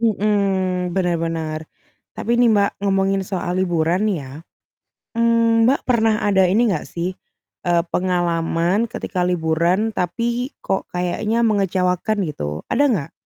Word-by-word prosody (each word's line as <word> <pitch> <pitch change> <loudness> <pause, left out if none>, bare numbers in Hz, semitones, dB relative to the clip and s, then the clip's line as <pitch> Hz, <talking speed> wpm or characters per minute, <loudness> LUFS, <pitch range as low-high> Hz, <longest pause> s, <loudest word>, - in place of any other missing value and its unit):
Mhm, 195 -4 0
bener 180 -3 +1
bener. 160 -1 -3 0.5
Tapi 235 +2 -1
ini 245 - +5
Mbak, 200 -1 +1
ngomongin 195 0 +1
soal 180 -1 -2
liburan 175 +2 +1
nih 200 -4 +1
ya. 130 -1 -10 0.8
Mmm, 230 0 +3
Mbak, 275 - +1
pernah 225 -3 +2
ada 190 -2 +4
ini 225 +4 +3
enggak 155 - -5
sih, 175 +2 -3 0.5
eee, 175 -1 +2
pengalaman 175 +3 0
ketika 185 -3 -4
liburan 180 +4 +1
tapi 235 +8 -2 0.2
kok 190 - -1
kayaknya 210 +6 0
mengecewakan 195 0 +1
gitu, 75 - -5
ada 285 - +1
nggak? 185 - -1
190 Hz, 130 wpm, -20 LUFS, 175-215 Hz, 0.8 s, ini